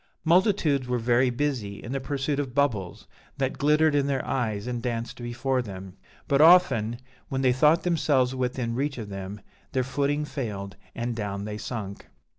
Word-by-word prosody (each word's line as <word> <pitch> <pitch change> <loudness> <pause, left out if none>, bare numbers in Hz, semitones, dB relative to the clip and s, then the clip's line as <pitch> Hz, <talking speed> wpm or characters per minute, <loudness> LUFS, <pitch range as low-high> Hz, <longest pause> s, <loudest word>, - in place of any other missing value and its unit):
Multitudes 165 - +3
were 125 0 0
very 120 +2 +3
busy 120 -6 -2
in 120 - -6
the 135 - -1
pursuit 140 +1 -2
of 135 -3 -4
bubbles 110 -11 0 0.3
that 135 -1 -2
glittered 150 +1 +4
in 140 -1 +2
their 135 -2 -1
eyes 110 -5 -1
and 120 -1 -3
danced 120 0 -4
before 125 +2 -1
them; 95 -4 -8 0.3
but 140 -1 +3
often, 135 -10 +5 0.3
when 135 0 -1
they 125 -1 +4
thought 150 +6 +4
themselves 145 -7 +2
within 125 -2 -2
reach 140 +3 -2
of 110 -4 -6
them, 95 +1 -6 0.3
their 130 - +1
footing 145 +3 0
failed 100 -9 -5 0.2
and 120 0 -2
down 100 -2 -4
they 105 0 -5
sunk. 105 -3 -6
125 Hz, 170 wpm, -26 LUFS, 115-140 Hz, 0.3 s, often